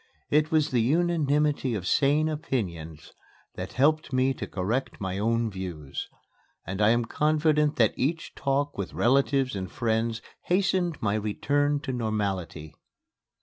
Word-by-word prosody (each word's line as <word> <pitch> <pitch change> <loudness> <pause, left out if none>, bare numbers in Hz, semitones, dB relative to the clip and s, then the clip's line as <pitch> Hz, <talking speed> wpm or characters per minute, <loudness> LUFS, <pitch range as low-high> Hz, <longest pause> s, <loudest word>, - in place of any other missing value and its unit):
It 150 +1 +3
was 155 -2 +2
the 120 -3 +2
unanimity 150 -2 +1
of 95 -4 -4
sane 145 +8 +3
opinions 90 - -4 0.4
that - - -6
helped 155 +3 +2
me 130 +1 +2
to - - -6
correct 110 +8 -2
my 95 0 -3
own 115 +1 +1
views; 90 -7 -6 0.6
and 95 +3 -4
I 105 - +5
am 120 +1 +2
confident 150 +2 +2
that 110 -4 +3
each 155 +5 -2
talk 140 -2 -1
with 100 - -4
relatives 135 0 +2
and 95 -1 -5
friends 115 -2 -1 0.2
hastened 180 -3 +1
my 100 -1 +1
return 145 +7 0
to 130 - -4
normality. 100 -9 -3
130 Hz, 140 wpm, -27 LUFS, 105-150 Hz, 0.6 s, I